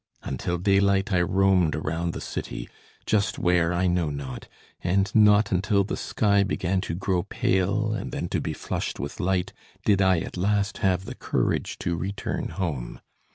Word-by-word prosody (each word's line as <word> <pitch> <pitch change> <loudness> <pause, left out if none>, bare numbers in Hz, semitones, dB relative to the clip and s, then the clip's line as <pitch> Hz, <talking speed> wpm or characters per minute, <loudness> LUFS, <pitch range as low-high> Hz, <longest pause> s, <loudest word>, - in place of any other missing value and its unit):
Until 80 +7 -2
daylight 100 +1 +2
I 90 - +4
roamed 90 -3 +3
around 80 +2 -2
the - - -6
city, - - -5 0.4
just 110 0 +1
where 90 -1 +2
I 90 +1 +1
know 90 -3 +1
not; 70 -3 -6 0.4
and 95 +3 +1
not 105 -1 +5
until 100 +2 +2
the 95 - -3
sky 100 -2 +2
began 95 -1 0
to 80 - -1
grow 95 0 0
pale 100 +5 0
and 110 - -4
then - - -3
to - - -1
be - - -3
flushed - - -4
with 70 +7 -5
light 95 0 0 0.3
did 100 -2 +4
I 95 -1 +4
at - - -6
last 100 +2 0
have 95 -1 +1
the - - -6
courage - - -1
to 85 - +1
return 95 +5 -3
home. 75 -11 -4
95 Hz, 170 wpm, -26 LUFS, 85-100 Hz, 0.4 s, not